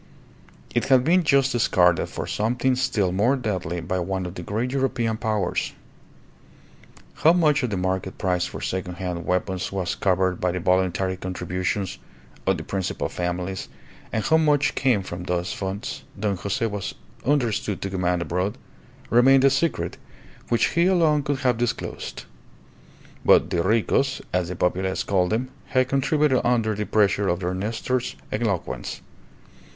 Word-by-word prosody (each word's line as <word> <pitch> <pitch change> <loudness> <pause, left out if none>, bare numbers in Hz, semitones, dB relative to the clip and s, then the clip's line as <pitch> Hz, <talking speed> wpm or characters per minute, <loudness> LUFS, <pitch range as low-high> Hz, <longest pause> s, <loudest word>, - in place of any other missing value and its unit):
It - - +1
had 130 -2 +5
been 175 +6 +4
just 140 -3 +3
discarded 90 -8 +3
for - - -5
something 125 +4 0
still 110 -8 +1
more 105 +9 +3
deadly 95 - -3
by 90 +3 -2
one 95 +1 -2
of 90 - -5
the 90 - -7
great 110 +8 -2
European 130 -4 0
powers. 110 -5 -1 1.5
How 160 - +7
much 155 -5 +3
of 125 - -1
the 100 - -2
market 95 0 -2
price 90 -1 0
for - - -8
second 90 -1 -3
hand 90 -1 -4
weapons 90 0 -1
was 95 -3 -1
covered 95 -1 +1
by 90 -1 +1
the 90 - -2
voluntary 95 +1 +1
contributions 90 +1 -3 0.5
of - - +3
the - - -6
principal 95 -2 -2
families, 90 +2 -3 0.4
and 110 - -1
how 160 - +4
much 150 -3 +3
came 125 -7 +2
from 90 -1 -6
those 90 0 -1
funds 95 +2 -4 0.2
Don 100 -1 0
Jose 100 +7 -2
was 105 -3 -3 0.3
understood 120 -7 0
to 95 - -2
command 90 -2 0
abroad, 90 +4 -2 0.5
remained 130 +3 +6
a 135 - +6
secret 150 +5 0 0.5
which 120 -2 +3
he 170 +1 +2
alone 165 -5 +3
could 140 0 -1
have 125 -3 +2
disclosed; 120 -1 -3 1.0
but - - +5
the 85 - +1
Ricos, 115 +8 +1
as 90 -1 +1
the 90 - -4
populace 95 +2 0
called 90 -2 +1
them, 120 +5 -1 0.2
had 130 -1 +2
contributed 140 0 +2
under 115 -3 +2
the 105 0 -3
pressure 100 -1 +2
of 85 +1 0
their 90 0 -1
Nestor's 115 +6 -2 0.2
eloquence. 105 -5 -2
100 Hz, 155 wpm, -24 LUFS, 90-125 Hz, 1.5 s, How